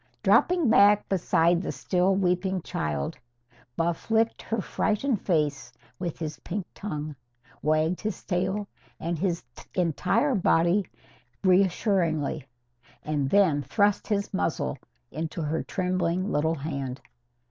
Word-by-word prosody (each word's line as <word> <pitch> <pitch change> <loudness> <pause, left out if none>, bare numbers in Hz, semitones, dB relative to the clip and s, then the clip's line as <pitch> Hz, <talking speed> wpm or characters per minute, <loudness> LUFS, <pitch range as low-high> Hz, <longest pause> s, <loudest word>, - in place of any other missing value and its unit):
Dropping 350 -5 +4
back 210 -1 +5
beside 170 -2 +2
the - - -3
still 185 +1 +1
weeping 185 -1 0
child, 75 -2 -3 0.6
Buff 170 +3 -2
licked 225 0 +2
her 225 - -2
frightened 215 +5 0
face 150 -8 0 0.3
with 170 -3 -3
his 155 -2 -5
pink 190 0 -4
tongue, 155 -6 -5 0.5
wagged 155 +3 +1
his 215 -4 -4
tail 190 +3 -1 0.3
and 165 -1 -2
his 175 -2 -1 0.3
entire 180 - +1
body 180 -1 +3 0.6
reassuringly, 180 - +2 0.6
and 145 -3 -1
then 180 -7 +4
thrust 205 - +1
his 200 -1 -1
muzzle 170 -6 -1 0.4
into 160 +3 -4
her 155 +2 -1
trembling 185 0 -1
little 160 +2 +1
hand. 140 -3 -4
180 Hz, 115 wpm, -27 LUFS, 155-200 Hz, 0.6 s, back